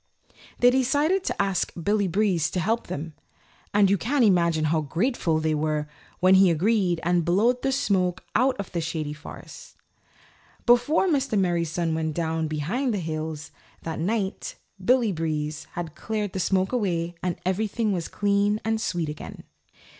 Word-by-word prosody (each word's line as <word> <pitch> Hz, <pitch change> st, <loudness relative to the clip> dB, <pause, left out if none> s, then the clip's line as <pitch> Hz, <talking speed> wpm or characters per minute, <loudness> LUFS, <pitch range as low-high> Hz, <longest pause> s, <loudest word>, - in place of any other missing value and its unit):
They 245 Hz, -, +6 dB
all 260 Hz, +1 st, +2 dB
decided 300 Hz, +9 st, +2 dB
to -, -, -3 dB
ask 195 Hz, -2 st, 0 dB
Billy 200 Hz, +3 st, +1 dB
Breeze 185 Hz, -3 st, +1 dB
to 185 Hz, -, -2 dB
help 225 Hz, +7 st, -1 dB
them, 155 Hz, +2 st, -5 dB, 0.6 s
and 205 Hz, -1 st, +4 dB
you 200 Hz, 0 st, +2 dB
can 260 Hz, -, +1 dB
imagine 170 Hz, -6 st, +3 dB
how 155 Hz, +1 st, +1 dB
grateful 165 Hz, -, 0 dB
they 155 Hz, 0 st, 0 dB
were 150 Hz, 0 st, -1 dB, 0.3 s
when 185 Hz, +1 st, +5 dB
he 190 Hz, -1 st, +6 dB
agreed 180 Hz, +1 st, +2 dB
to 175 Hz, 0 st, +3 dB
blow 195 Hz, +9 st, +3 dB
the 255 Hz, +2 st, -2 dB
smoke 190 Hz, -8 st, 0 dB
out 255 Hz, +4 st, +2 dB
of 200 Hz, -, -5 dB
the 170 Hz, -, -2 dB
Shady 160 Hz, -2 st, -3 dB
Forest. 150 Hz, -, -11 dB, 0.9 s
Before 245 Hz, +10 st, +4 dB
Mr. 275 Hz, -, +1 dB
Merry 175 Hz, -3 st, +1 dB
Sun 165 Hz, 0 st, -1 dB
went 160 Hz, -1 st, -2 dB
down 160 Hz, -1 st, -1 dB
behind 200 Hz, -, -1 dB
the -, -, -1 dB
hills 155 Hz, -2 st, -5 dB, 0.3 s
that 160 Hz, -1 st, -4 dB
night 195 Hz, +3 st, -2 dB, 0.3 s
Billy 245 Hz, 0 st, +3 dB
Breeze 155 Hz, -3 st, -3 dB
had 170 Hz, -3 st, -5 dB
cleared 210 Hz, -3 st, -3 dB
the 190 Hz, -, -3 dB
smoke 190 Hz, +1 st, +1 dB
away 175 Hz, -8 st, -1 dB
and 180 Hz, -1 st, -1 dB
everything 215 Hz, +3 st, 0 dB
was 175 Hz, -4 st, -2 dB
clean 205 Hz, +1 st, +1 dB
and 225 Hz, 0 st, 0 dB
sweet 175 Hz, -6 st, -1 dB
again. 150 Hz, 0 st, -8 dB
185 Hz, 165 wpm, -25 LUFS, 160-220 Hz, 0.9 s, They